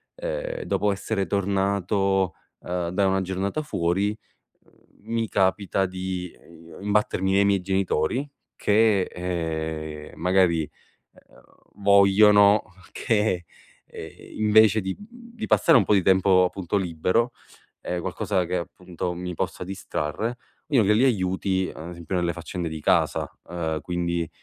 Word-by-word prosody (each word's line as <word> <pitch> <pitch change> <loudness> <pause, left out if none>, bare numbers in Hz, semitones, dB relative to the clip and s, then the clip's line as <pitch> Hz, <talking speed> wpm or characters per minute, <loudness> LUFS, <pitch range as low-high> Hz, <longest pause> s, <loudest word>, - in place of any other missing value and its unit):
ehm, - - -4
dopo 105 - 0
essere 100 0 -2
tornato, 100 -1 0 0.3
uhm, 90 -1 -3
da 95 +2 +1
una 95 0 +1
giornata 95 +9 -2
fuori, 95 - 0 0.6
ehm, - - -27 0.4
mi 115 -1 0
capita 95 0 +1
di, 90 -1 -5
ehm, 85 0 -15
i - - -9
imbattermi 100 -2 +1
nei 100 +1 +4
miei 100 -1 +2
genitori 95 - 0 0.3
che, 105 -1 +3
ehm, 80 -3 -4
magari, 90 -2 +3 0.5
ehm, - - -22 0.4
vogliono 100 +1 +6 0.3
che, 105 -6 0 0.4
ehm, - - -9 0.3
invece 110 0 +5
di, 95 0 -3
mhmm 235 +3 -14
di 220 - -2
passare 165 -5 +5
un 105 - +2
po' 105 - +3
di 95 - +3
tempo, 95 0 +4
appunto 90 +1 -2
libero, 95 +6 0 0.5
ehm, 90 - -3
qualcosa 90 +2 -1
che 90 +1 -2
appunto 90 0 -5
mi 90 +1 -5
possa 90 - -3
distrarre, 95 +4 -3 0.3
io 135 -6 +4
li 105 +1 +3
gli 115 +5 +4
aiuti 95 -4 0
ad 80 +2 -8
esempio 85 +1 -5
nelle 85 -1 0
faccende 85 0 -5
di 80 -1 -6
casa. - - +2 0.2
Uhm, 80 -3 -3
quindi, 85 -1 -2
95 Hz, 140 wpm, -24 LUFS, 90-105 Hz, 0.6 s, vogliono